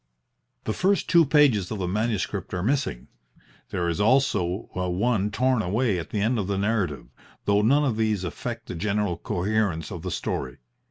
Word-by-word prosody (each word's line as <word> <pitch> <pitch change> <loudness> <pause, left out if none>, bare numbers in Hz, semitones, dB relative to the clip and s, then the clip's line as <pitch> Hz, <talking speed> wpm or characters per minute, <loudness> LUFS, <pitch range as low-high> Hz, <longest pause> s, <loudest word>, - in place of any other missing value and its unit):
The 110 - -2
first 195 - +1
two 170 -4 +5
pages 135 - +4
of 110 - -3
the 95 -2 -2
manuscript 105 0 -2
are 90 - -2
missing. 130 - -1 0.6
There 85 -1 -1
is 85 +4 -1
also 105 -6 +2
one 95 +4 0
torn 125 +2 +1
away 105 0 0
at 80 - -7
the 105 - -2
end 115 +3 +1
of 95 - -2
the 100 -1 -1
narrative, 100 -7 -1 0.4
though 100 0 +3
none 140 +7 +3
of 120 -6 0
these 110 -4 0
affect 115 +5 -5
the - - -6
general 100 +1 -1
coherence 95 -2 -1
of 85 - -6
the 90 - -4
story. 65 -6 -3
105 Hz, 175 wpm, -25 LUFS, 90-120 Hz, 0.6 s, two